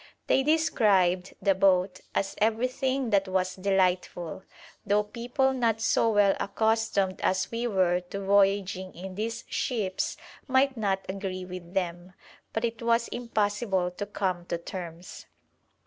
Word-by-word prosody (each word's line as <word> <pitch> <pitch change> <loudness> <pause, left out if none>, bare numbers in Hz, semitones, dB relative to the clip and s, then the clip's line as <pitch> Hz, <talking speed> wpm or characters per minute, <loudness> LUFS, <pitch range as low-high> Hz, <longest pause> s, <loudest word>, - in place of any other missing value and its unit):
They - - +3
described 205 - +2
the 200 - +4
boat 185 -1 +2
as 195 - 0
everything 255 +3 0
that 195 -1 +3
was 185 -1 0
delightful, 185 -3 0 0.4
though 205 +1 +2
people 245 +5 0
not 230 -4 +1
so 225 0 +2
well 205 -2 +4
accustomed 220 -2 0
as 185 0 0
we 235 +1 -1
were 185 -4 +2
to 200 - -4
voyaging 195 -1 +2
in 185 +2 -7
these 225 +3 -3
ships 205 -7 -2 0.3
might 260 0 +3
not 195 -4 -1
agree 190 -1 -4
with 180 0 -9
them, 175 -1 -2 0.4
but 225 +1 -1
it 230 0 -4
was 235 0 +2
impossible 205 -5 -1
to 200 +3 -5
come 185 -4 -2
to - - -1
terms. 170 0 -8
200 Hz, 135 wpm, -28 LUFS, 185-230 Hz, 0.4 s, the